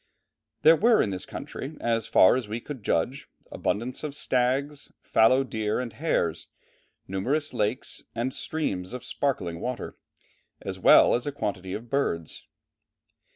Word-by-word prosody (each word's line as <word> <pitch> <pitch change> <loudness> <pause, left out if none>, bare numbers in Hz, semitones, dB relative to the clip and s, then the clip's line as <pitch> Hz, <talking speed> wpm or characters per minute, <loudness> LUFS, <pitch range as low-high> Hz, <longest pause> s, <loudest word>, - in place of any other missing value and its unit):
There 160 +1 +8
were 225 +6 +4
in 100 - +2
this 95 -1 -6
country, 145 +3 -7
as 115 -1 0
far 95 - +6
as 125 -4 -2
we 110 +3 -3
could 135 0 -8
judge, 110 +8 -1 0.2
abundance 120 +7 -2
of 145 -2 -4
stags, 140 +1 0
fallow 130 +4 +4
deer 110 -4 -2
and 125 -3 -4
hares, 135 - -1 0.6
numerous 135 +12 -1
lakes, 110 +1 -2
and 120 +3 -1
streams 100 -12 -3
of 125 -1 -6
sparkling 90 -13 -2
water, 125 +4 -4 0.6
as - - -6
well - - +7
as 120 +3 -1
a - - 0
quantity 100 -8 -4
of 115 +2 -7
birds. 85 - -2
125 Hz, 145 wpm, -26 LUFS, 105-140 Hz, 0.6 s, There